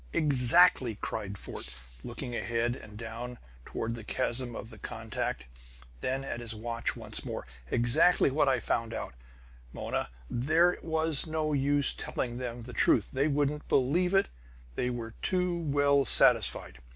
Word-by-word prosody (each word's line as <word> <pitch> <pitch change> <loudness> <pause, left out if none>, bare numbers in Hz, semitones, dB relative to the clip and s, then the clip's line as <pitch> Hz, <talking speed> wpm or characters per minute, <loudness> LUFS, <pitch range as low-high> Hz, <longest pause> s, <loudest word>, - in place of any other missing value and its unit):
"Exactly!" 135 -2 +5
cried 100 -1 -5
Fort, 65 -7 -8 0.3
looking 120 - -6
ahead 120 +1 -1
and 105 -4 -12
down, 115 +2 -7 0.3
toward 115 +1 -4
the 115 -2 -7
chasm 120 +1 -2
of 115 - -7
the 110 - -12
contact, - - -4 0.5
then 130 - -2
at 135 - -5
his 115 -2 -6
watch 115 +1 -3
once - - -5
more. - - -5 0.2
"Exactly 140 - +4
what 140 0 +2
I 130 -2 +2
found 115 0 -2
out, - - -5 0.6
Mona! - - -3 0.2
There 160 - +2
was 160 -1 +3
no 155 -1 -1
use 145 +1 +2
telling 120 -1 -4
them 120 -2 -5
the 125 +1 -9
truth; - - +3
they 135 +3 +1
wouldn't 145 0 -1
believe 175 +8 +2
it! 195 - +4 0.5
They 125 - -1
were 115 -2 -5
too 180 -1 0
well 145 -3 +2
satisfied. 60 - +3
130 Hz, 150 wpm, -29 LUFS, 115-150 Hz, 0.6 s, Exactly